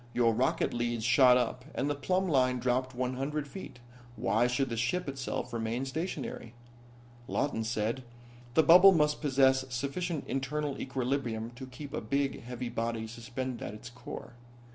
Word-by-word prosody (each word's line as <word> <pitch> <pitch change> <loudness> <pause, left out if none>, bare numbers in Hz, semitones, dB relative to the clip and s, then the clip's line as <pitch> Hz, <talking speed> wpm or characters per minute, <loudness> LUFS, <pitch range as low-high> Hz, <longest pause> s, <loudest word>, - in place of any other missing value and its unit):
Your 115 -2 +4
rocket 125 +4 +1
leads 120 -1 -1
shot 125 +1 +6
up, 125 +1 -1
and 140 - 0
the 145 - +1
plumb 185 +7 0
line 130 -5 +3
dropped 130 +1 0
one 125 0 -2
hundred 145 +2 -2
feet. 190 -2 -9 0.4
Why 120 +2 +2
should 125 +2 0
the 115 - -2
ship 135 +11 -1
itself 130 -2 -4
remain 115 +3 -2
stationary?" 135 -5 -4 0.7
Lawton 125 -6 -1
said: 115 +2 -1 0.5
"The 160 - +6
bubble 180 +5 +9
must 150 -3 +2
possess 135 -2 +4
sufficient 140 +6 -2
internal 140 +2 -2
equilibrium 125 -4 -2
to 130 +2 -9
keep 140 +2 -9
a - - -2
big, 140 +4 -1
heavy 125 0 -5
body 115 -1 -2
suspended 120 +2 -5
at 105 - -5
its 110 - -10
core. 120 0 -9
130 Hz, 160 wpm, -31 LUFS, 120-140 Hz, 0.7 s, bubble